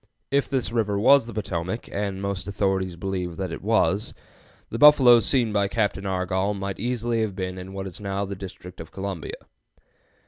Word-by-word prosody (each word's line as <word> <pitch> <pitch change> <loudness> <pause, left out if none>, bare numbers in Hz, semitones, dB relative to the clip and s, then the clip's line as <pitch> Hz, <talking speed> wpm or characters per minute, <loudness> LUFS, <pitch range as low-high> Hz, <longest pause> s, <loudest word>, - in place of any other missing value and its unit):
If 140 0 +2
this 130 -4 -1
river 110 -4 0
was 130 +4 +5
the 120 - -7
Potomac, 95 0 -3
and 100 -1 -3
most 100 -1 -3
authorities 95 -2 0
believe 90 -2 -4
that 95 -1 -3
it - - -6
was, 105 -1 +1 0.6
the 115 - -3
buffaloes 130 -7 +7
seen 120 -6 +2
by 100 -1 +2
Captain 100 -1 -1
Argoll 95 +2 0
might 100 0 -4
easily 120 0 -1
have 105 -4 -2
been 95 -1 -4
in 95 +1 -8
what 95 0 -5
is 95 +1 -7
now 100 0 -2
the 100 - -5
District 90 -2 -9
of 80 - -10
Columbia. 95 -4 -5
100 Hz, 180 wpm, -25 LUFS, 95-110 Hz, 0.6 s, buffaloes